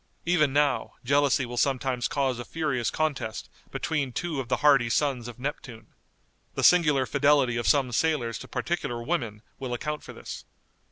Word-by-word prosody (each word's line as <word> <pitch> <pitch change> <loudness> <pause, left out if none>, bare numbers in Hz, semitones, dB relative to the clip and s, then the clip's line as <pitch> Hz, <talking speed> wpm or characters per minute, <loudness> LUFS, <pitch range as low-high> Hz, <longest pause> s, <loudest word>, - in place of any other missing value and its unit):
Even 160 -5 +3
now, 140 -5 +1
jealousy 140 0 +2
will 120 0 -7
sometimes 130 -2 0
cause 135 -3 -1
a - - -4
furious 140 -6 -1
contest 145 -8 -3 0.2
between 145 -5 -2
two 160 +2 -3
of 130 - -4
the 125 - +1
hardy 135 -5 +5
sons 130 -2 0
of 120 - -9
Neptune. 125 -4 -7 0.6
The - - -2
singular 150 -7 +5
fidelity 140 -3 +3
of 120 - -1
some 135 -4 +3
sailors 120 -4 0
to - - -9
particular 120 -1 -3
women 115 -8 -2 0.2
will 130 -3 -3
account 150 +4 -4
for - - -10
this. - - -8
135 Hz, 165 wpm, -27 LUFS, 120-150 Hz, 0.6 s, hardy